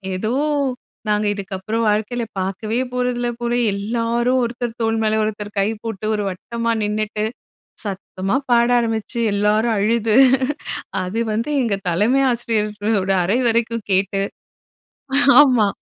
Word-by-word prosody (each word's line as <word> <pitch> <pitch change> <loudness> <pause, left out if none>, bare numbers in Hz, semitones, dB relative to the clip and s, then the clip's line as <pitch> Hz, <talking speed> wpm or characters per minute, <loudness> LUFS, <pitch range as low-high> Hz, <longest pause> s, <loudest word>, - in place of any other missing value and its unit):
ஏதோ 215 +5 -2 0.8
நாங்க 210 0 +1
இதுக்கப்புறம் 200 +3 -3
வாழ்க்கையில 220 +3 -1 0.2
பார்க்கவே 205 +5 -2
போறதில்ல 245 -1 -1
போல. 240 0 -1 0.2
எல்லாரும் 235 +4 0
ஒருத்தர் 235 0 -4
தோள் 225 0 +1
மேலே 220 0 +2
ஒருத்தர் 210 -1 -4
கை 195 - +2 0.2
போட்டு, 220 -2 -5
ஒரு 210 - -2
வட்டமா 230 +5 -3
நின்னுட்டு, 210 0 -2 0.6
சத்தமா 195 +1 -3 0.2
பாட 235 0 +4
ஆரம்பிச்சு, 225 0 -2
எல்லாரும் 210 +3 +2
அழுது 220 +1 +2 0.9
அது 185 +5 -3
வந்து 230 +7 -2
எங்க 220 -5 0
தலைமை 215 +11 +2
ஆசிரியர்களோட 210 -3 -1
அறை 205 +8 +1
வரைக்கும் 230 -1 -1
கேட்டு 195 +1 +1 1.2
ஆமா. 250 -7 +4
220 Hz, 120 wpm, -20 LUFS, 205-235 Hz, 1.2 s, பாட